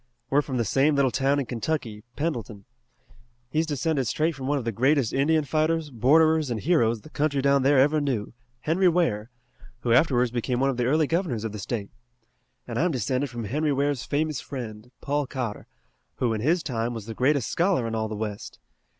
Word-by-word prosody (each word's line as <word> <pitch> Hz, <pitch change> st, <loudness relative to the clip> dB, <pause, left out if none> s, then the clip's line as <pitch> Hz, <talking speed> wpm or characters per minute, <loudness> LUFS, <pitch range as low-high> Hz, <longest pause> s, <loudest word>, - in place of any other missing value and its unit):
We're 145 Hz, +2 st, +4 dB
from 135 Hz, -3 st, -4 dB
the 115 Hz, -, 0 dB
same 140 Hz, +8 st, +2 dB
little 140 Hz, -2 st, +3 dB
town 135 Hz, +2 st, +1 dB
in 140 Hz, -, -1 dB
Kentucky, 115 Hz, -3 st, -3 dB
Pendleton. 120 Hz, -10 st, -4 dB, 0.9 s
He's 155 Hz, +2 st, +1 dB
descended 145 Hz, -2 st, 0 dB
straight 160 Hz, +7 st, 0 dB
from 135 Hz, -2 st, -6 dB
one 145 Hz, +1 st, +1 dB
of 130 Hz, -, -4 dB
the 115 Hz, -, 0 dB
greatest 130 Hz, +3 st, +2 dB
Indian 155 Hz, +3 st, +2 dB
fighters, 155 Hz, +1 st, 0 dB
borderers 155 Hz, +5 st, +3 dB
and 115 Hz, -2 st, -2 dB
heroes 115 Hz, -, +2 dB
the 155 Hz, -, -14 dB
country 145 Hz, -1 st, 0 dB
down 140 Hz, 0 st, +3 dB
there 140 Hz, +2 st, +4 dB
ever 150 Hz, +3 st, +4 dB
knew, 125 Hz, -8 st, -2 dB, 0.3 s
Henry 175 Hz, +6 st, +3 dB
Ware, 125 Hz, -11 st, 0 dB, 0.5 s
who 120 Hz, -1 st, +1 dB
afterwards 125 Hz, -3 st, +3 dB
became 125 Hz, +1 st, -1 dB
one 135 Hz, +1 st, +2 dB
of 125 Hz, -, -6 dB
the 120 Hz, -, 0 dB
early 155 Hz, +4 st, +3 dB
governors 165 Hz, -, -1 dB
of 110 Hz, -, -3 dB
the 105 Hz, -, -7 dB
State. 100 Hz, 0 st, -4 dB, 0.8 s
And 115 Hz, -1 st, -3 dB
I'm 175 Hz, +4 st, +2 dB
descended 130 Hz, -, -1 dB
from 120 Hz, -1 st, -6 dB
Henry 150 Hz, +8 st, 0 dB
Ware's 140 Hz, -2 st, 0 dB
famous 150 Hz, 0 st, -1 dB
friend, 115 Hz, -4 st, -7 dB
Paul 145 Hz, 0 st, -1 dB
Cotter, 125 Hz, -6 st, -5 dB, 0.5 s
who, 120 Hz, -3 st, 0 dB
in 110 Hz, -, -2 dB
his 165 Hz, +7 st, +2 dB
time, 120 Hz, -3 st, -2 dB
was 110 Hz, -3 st, -6 dB
the 115 Hz, -, -6 dB
greatest 130 Hz, +2 st, +1 dB
scholar 175 Hz, -8 st, +1 dB
in 115 Hz, -, -4 dB
all 110 Hz, -1 st, -1 dB
the 110 Hz, -, -5 dB
West. 105 Hz, -1 st, -5 dB
135 Hz, 200 wpm, -25 LUFS, 115-150 Hz, 0.9 s, We're